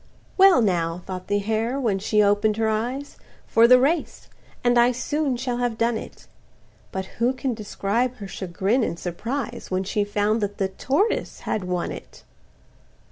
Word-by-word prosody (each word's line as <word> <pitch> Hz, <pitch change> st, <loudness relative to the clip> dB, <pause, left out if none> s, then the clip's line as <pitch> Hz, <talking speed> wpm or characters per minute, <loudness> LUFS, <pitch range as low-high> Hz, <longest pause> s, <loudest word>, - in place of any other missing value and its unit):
"Well 380 Hz, -9 st, +6 dB
now," 175 Hz, -3 st, 0 dB
thought 185 Hz, -1 st, -6 dB
the 205 Hz, -, +1 dB
hare, 220 Hz, +5 st, -1 dB
when 215 Hz, -7 st, 0 dB
she 210 Hz, +1 st, +2 dB
open'd 205 Hz, +1 st, +2 dB
her 225 Hz, -1 st, +1 dB
eyes, 245 Hz, +6 st, -2 dB, 0.3 s
"For 230 Hz, +1 st, +5 dB
the 250 Hz, +1 st, +7 dB
race,—and 270 Hz, -4 st, -1 dB
I 240 Hz, +1 st, +5 dB
soon 275 Hz, +1 st, -1 dB
shall 245 Hz, 0 st, -2 dB
have 245 Hz, -2 st, -1 dB
done 230 Hz, 0 st, +1 dB
it;" -, -, -8 dB, 0.7 s
But 190 Hz, 0 st, -3 dB, 0.2 s
who 245 Hz, +2 st, +3 dB
can 260 Hz, -1 st, -2 dB
describe 225 Hz, +3 st, -1 dB
her 205 Hz, -5 st, -8 dB
chagrin 195 Hz, +6 st, -1 dB
and 170 Hz, -, -1 dB
surprise, 230 Hz, +10 st, -4 dB
When 185 Hz, 0 st, 0 dB
she 205 Hz, +2 st, 0 dB
found 205 Hz, +2 st, 0 dB
that 205 Hz, 0 st, -3 dB
the 190 Hz, -1 st, 0 dB
tortoise 285 Hz, -, -1 dB
had 210 Hz, -4 st, -2 dB
won 180 Hz, -1 st, -2 dB
it! -, -, -10 dB
220 Hz, 165 wpm, -24 LUFS, 200-250 Hz, 0.7 s, the